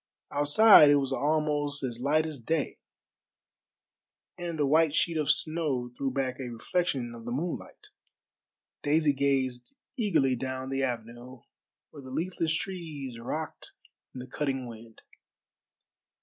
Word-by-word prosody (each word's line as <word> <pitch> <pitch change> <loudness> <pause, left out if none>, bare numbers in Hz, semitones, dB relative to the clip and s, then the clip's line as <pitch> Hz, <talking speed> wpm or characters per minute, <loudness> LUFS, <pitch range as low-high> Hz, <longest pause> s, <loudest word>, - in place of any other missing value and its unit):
Outside 150 +3 +7
it 145 - +6
was 135 -1 0
almost 145 0 0
as 120 -2 -4
light 155 +4 +2
as 155 -4 -6
day, 150 +6 -2 1.6
and 175 -2 -5
the 150 - +2
white 155 +1 +3
sheet 170 +1 +1
of 155 -2 -1
snow 150 -7 0
threw 135 +1 -1
back 130 -1 -2
a 130 -2 -5
reflection 120 +1 -2
of 115 -1 -10
the 120 - -5
moonlight. 160 +7 -5 0.9
Daisy 150 0 +2
gazed 130 -3 -1 0.2
eagerly 165 - +2
down 130 +1 -4
the 135 0 -1
avenue, 120 0 -5 0.5
where 145 - -11
the 130 - -11
leafless 165 +2 -1
trees 155 -10 -5
rocked 155 +7 -6 0.4
in - - -6
the - - -7
cutting 135 -1 -2
wind. 115 -1 -12
140 Hz, 135 wpm, -28 LUFS, 130-155 Hz, 1.6 s, Outside